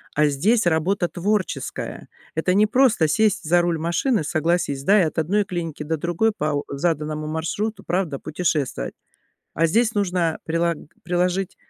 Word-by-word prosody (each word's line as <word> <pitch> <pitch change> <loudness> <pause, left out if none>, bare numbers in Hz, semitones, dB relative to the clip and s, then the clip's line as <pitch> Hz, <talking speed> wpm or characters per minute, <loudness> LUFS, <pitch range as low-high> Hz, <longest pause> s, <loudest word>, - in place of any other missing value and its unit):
А 150 0 +4
здесь 190 - +2
работа 175 +3 +1
творческая. 200 +2 -3 0.3
Это 160 +3 +1
не 210 +2 +4
просто 240 -8 +3
сесть 210 +3 +2
за 175 +2 +3
руль 170 -2 0
машины, 175 - +1
согласись, 155 -3 0
да, 200 +6 +5
и 170 - +3
от 155 - -4
одной 200 +7 +1
клиники 165 -5 -4
до 160 +2 -2
другой 175 +8 +1
по 150 0 0
у - - -5
заданному 155 0 -2
маршруту, 165 +8 -3
правда, 175 -6 -1
путешествовать. 150 - -2 0.6
А 165 - +3
здесь 225 +7 +2
нужно 180 -5 0
прилаг 165 0 0 0.3
приложить 180 +1 -1
175 Hz, 155 wpm, -22 LUFS, 155-195 Hz, 0.6 s, да